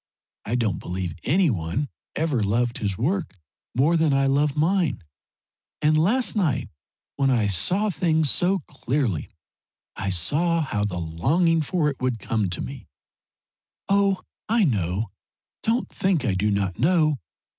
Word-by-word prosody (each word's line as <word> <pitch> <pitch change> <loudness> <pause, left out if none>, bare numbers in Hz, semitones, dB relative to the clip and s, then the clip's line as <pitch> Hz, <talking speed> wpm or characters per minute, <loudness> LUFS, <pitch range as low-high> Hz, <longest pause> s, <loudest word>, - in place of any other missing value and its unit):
I 115 - -1
don't 110 -6 0
believe 90 -1 -4
any 175 +1 +3
one 90 - -2 0.3
ever 150 -7 0
loved 115 +4 0
his 100 -3 -2
work 170 - -1 0.4
more 145 +7 +3
than 160 -3 +3
I 135 0 +3
love 140 +2 +1
mine, 165 - +1 0.8
and 155 0 +3
last 220 +13 +2
night 150 - 0 0.5
when 135 -1 +2
I 120 -5 +2
saw 185 - +1
things 160 -4 +1
so 185 +2 +3
clearly 120 - -2 0.7
I 95 0 -3
saw 150 - +1
how 105 -9 -1
the 90 -4 -3
longing 140 - +1
for 155 +1 0
it 140 -3 -3
would 130 -2 0
come 110 -3 -1
to 85 - -4
me - - -7 1.0
oh, 200 -1 +2 0.3
I 230 0 +3
know. 100 - 0 0.5
Don't 230 +3 0
think 180 -8 0
I 105 - +1
do 100 +3 +1
not 100 -2 -1
know. 155 -1 +3
135 Hz, 145 wpm, -24 LUFS, 105-170 Hz, 1.0 s, any